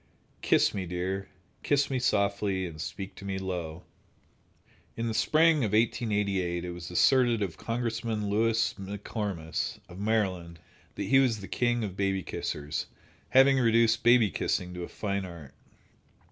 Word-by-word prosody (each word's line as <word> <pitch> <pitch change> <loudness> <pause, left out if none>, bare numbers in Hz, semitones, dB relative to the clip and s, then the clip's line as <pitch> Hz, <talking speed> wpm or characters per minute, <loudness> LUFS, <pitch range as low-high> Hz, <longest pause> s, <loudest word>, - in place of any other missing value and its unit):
Kiss - - +3
me, 95 -3 -3
dear! 95 +2 -3 0.3
Kiss 140 -1 +1
me 130 - 0
softly, 100 -4 +1
and 80 -3 -7
speak 95 +4 -6
to - - -10
me 95 -1 -3
low. 90 -3 -4 1.1
In 115 - -2
the 115 - -1
spring 160 +7 +4
of 110 -8 -1
1888 100 -6 0
it 90 - -4
was 85 0 -8
asserted 120 +4 +3
of 95 -4 -4
Congressman 115 -2 -2
Lewis 115 +2 +2
E. - - -7
McComas, 100 -4 -4
of 90 +1 -11
Maryland, 95 -6 -1 0.4
that - - -3
he 135 +1 +4
was 125 -5 +2
the 95 - -8
king 120 -1 0
of 95 -4 -4
baby 95 -1 0
kissers, 75 -4 -4 0.4
having 135 +1 +6
reduced 115 -1 +3
baby 120 -4 +5
kissing 90 -1 -1
to 90 - -6
a 85 - -4
fine 100 -2 -3
art. 85 -7 -10
100 Hz, 155 wpm, -28 LUFS, 90-115 Hz, 1.1 s, having